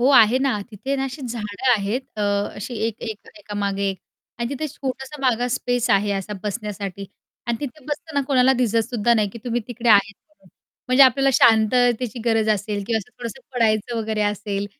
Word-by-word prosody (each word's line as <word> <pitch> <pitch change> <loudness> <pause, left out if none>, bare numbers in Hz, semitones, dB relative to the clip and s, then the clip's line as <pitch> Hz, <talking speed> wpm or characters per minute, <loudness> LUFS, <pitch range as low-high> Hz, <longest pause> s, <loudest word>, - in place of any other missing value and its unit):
हो, 250 - +4
आहे 240 -1 +6
ना. 265 -6 0
तिथे 260 +7 -3
ना 270 - -1
अशी 270 +2 -6
झाडं 230 0 -2
आहेत. 215 +2 0 0.2
अ, - - 0 0.3
अशी 225 +5 -6
एक-एक 220 -1 -6
एका 205 0 -9
मागे 200 -1 0
एक 190 - -7 0.4
आणि 235 - -1
तिथे 280 +2 -3
छोटासा 270 +1 -6
माग 245 -2 +2
स्पेस 245 -1 0
आहे 205 +1 +3
असा 195 +1 -3
बसण्यासाठी 200 -2 -4 0.4
आणि 235 -1 0
तिथे 285 0 -7
बसताना 305 -1 -3
कोणाला 265 -2 +4
दिसतसुद्धा 235 -1 +1
नाही, 215 -3 +2
की 230 - -9
तुम्ही 240 -1 -1
तिकडे 240 0 -2
आहेत 205 -1 +5
म्हणून 195 -12 -26 0.4
म्हणजे 255 +2 +7
आपल्याला 270 +1 +4
शांततेची 240 +1 +3
गरज 225 -2 +2
असेल 205 0 -3
किंवा 225 0 +1
असं 215 - -10
थोडंसं 240 +2 -6
पडायचं 225 -1 +1
वगैरे 220 -1 -1
असेल, 205 -1 -2
230 Hz, 180 wpm, -22 LUFS, 210-255 Hz, 0.4 s, म्हणजे